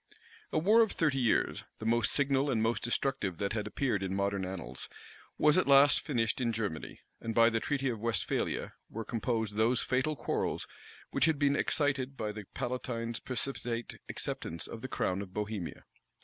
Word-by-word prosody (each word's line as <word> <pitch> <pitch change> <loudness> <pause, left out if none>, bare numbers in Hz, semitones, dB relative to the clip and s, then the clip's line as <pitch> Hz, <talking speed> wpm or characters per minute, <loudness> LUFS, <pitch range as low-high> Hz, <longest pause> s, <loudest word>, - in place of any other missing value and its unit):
A - - 0
war 210 +8 +6
of 220 - +3
thirty 150 -5 +1
years, 120 -3 +2
the 110 - -7
most 115 0 +3
signal 140 0 +2
and 120 -5 +1
most 115 +2 +1
destructive 120 -6 -1
that 100 +3 -1
had 110 -2 -2
appeared 125 -8 0
in 95 0 -2
modern 100 -1 0
annals, 85 -9 -6 0.5
was 150 +3 +5
at - - +1
last 140 +1 +7
finished 115 -4 0
in 120 -2 +1
Germany,[*] 105 -8 -4 0.2
and 115 -1 -4
by 115 0 +6
the 115 - +1
treaty 135 +2 -1
of 115 -4 -1
Westphalia, 115 +1 -1 0.2
were 115 0 -5
composed 110 -3 -1
those 115 +3 +3
fatal 130 +5 +1
quarrels 125 - -1 0.5
which 135 +1 +3
had 160 -2 +2
been 140 -1 +3
excited 140 -3 0
by 105 -1 -2
the 105 -1 -8
palatine's 120 -2 -3
precipitate 120 -2 -3
acceptance 80 0 -4
of 115 - -8
the 130 - -4
crown 95 -6 -1
of 95 -2 -9
Bohemia. 105 -4 -4
115 Hz, 175 wpm, -32 LUFS, 105-135 Hz, 0.5 s, last